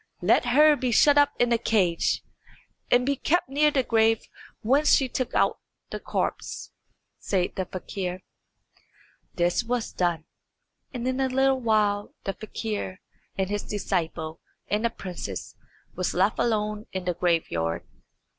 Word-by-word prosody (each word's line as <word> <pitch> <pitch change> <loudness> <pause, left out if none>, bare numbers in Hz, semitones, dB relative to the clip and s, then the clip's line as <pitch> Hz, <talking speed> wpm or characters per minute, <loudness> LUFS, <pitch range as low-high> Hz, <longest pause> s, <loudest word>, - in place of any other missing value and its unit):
"Let - - +4
her 300 +4 +6
be 260 -3 -1
shut 285 +5 +5
up 290 0 +4
in 245 -1 +3
a 230 - +2
cage, 190 -7 +1 0.7
and 245 0 +4
be 280 +1 +1
kept 320 +1 0
near 295 +2 +3
the 280 -3 +1
grave 225 -1 +3 0.4
whence 280 +7 +3
she 265 - +2
took 255 0 -3
out - - +2 0.3
the - - -4
corpse," - - -3 0.5
said 185 -3 -1
the 190 - -2
fakir. 185 0 -5 1.1
This 175 +5 +1
was 235 -1 -2
done, 170 -3 0 0.7
and 250 -1 -4
in 260 +1 -1
a 265 -1 +1
little 265 +1 +2
while 210 -3 +1
the 195 - -2
fakir 210 -3 -5 0.4
and 190 0 -1
his 205 0 -1
disciple 165 -5 -3 0.3
and 210 +2 0
the - - +3
princess 175 - -7 0.4
were 185 - -4
left 195 +4 +2
alone 215 -2 0
in 190 -1 -4
the 180 - 0
graveyard. 160 - 0
215 Hz, 145 wpm, -26 LUFS, 185-255 Hz, 1.1 s, her